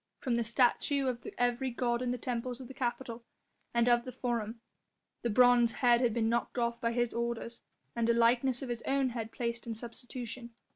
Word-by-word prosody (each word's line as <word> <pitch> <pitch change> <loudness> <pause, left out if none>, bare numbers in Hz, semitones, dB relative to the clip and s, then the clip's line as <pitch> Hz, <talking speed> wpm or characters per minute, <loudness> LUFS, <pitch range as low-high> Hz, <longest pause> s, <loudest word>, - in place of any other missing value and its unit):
From 250 -4 -1
the 235 - +1
statue 255 +4 +2
of 245 -2 -3
every 245 +2 +1
god 240 0 0
in 250 - -1
the 250 - -1
temples 245 +1 -3
of 255 - -8
the 265 - -9
Capitol 240 -2 -3 0.5
and 235 0 +2
of 240 -1 +4
the 255 - -6
Forum 235 -3 -3 0.6
the 240 - -1
bronze 245 0 +5
head 240 -2 +4
had 240 -2 +3
been 225 0 +1
knocked 235 +2 -1
off 235 -1 0
by 230 - +1
his 240 0 0
orders, 235 0 -3 0.3
and 235 -1 +1
a - - +6
likeness 240 +2 +3
of 260 - -5
his 240 -1 -3
own 270 -1 +2
head 230 -2 -5
placed 235 -1 -3
in 225 - -3
substitution. 240 0 -8
240 Hz, 200 wpm, -32 LUFS, 235-250 Hz, 0.6 s, a